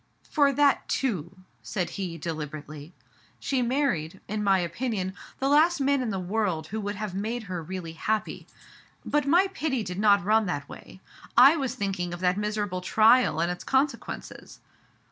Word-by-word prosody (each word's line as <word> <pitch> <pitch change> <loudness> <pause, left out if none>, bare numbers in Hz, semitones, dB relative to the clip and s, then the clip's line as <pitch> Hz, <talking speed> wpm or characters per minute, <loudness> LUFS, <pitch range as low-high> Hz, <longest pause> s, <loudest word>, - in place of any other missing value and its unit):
"For 285 -3 +3
that 285 +1 +2
too/* 190 - -2 0.3
said 180 -4 -3
he 180 -4 -4
deliberately. 155 -1 -6 0.5
"She 265 -2 -1
married, 235 - -1
in 210 0 -2
my 195 -1 +4
opinion, 190 +2 -2 0.2
the 270 - -1
last 310 +4 +4
man 280 0 +2
in 245 - -2
the 195 -2 -2
world 185 -4 -1
who 220 +3 -3
would 205 0 -3
have 210 -2 -5
made 220 +5 -3
her 180 -4 -5
really 170 0 -6
happy. 215 +6 -2 0.6
But 295 -2 0
my 350 +6 +5
pity 275 - -1
did 180 -1 -5
not 200 -2 +4
run 215 0 +3
that 145 -5 -3
way. 190 - -12 0.4
I 270 +6 +8
was 265 -5 -2
thinking 190 -6 -2
of - - -11
that 180 0 +2
miserable 205 -3 -2
trial 220 -2 +4
and 170 +1 +1
its 180 - -6
con 270 +2 +3
sequences." - - -9
205 Hz, 170 wpm, -27 LUFS, 180-255 Hz, 0.6 s, I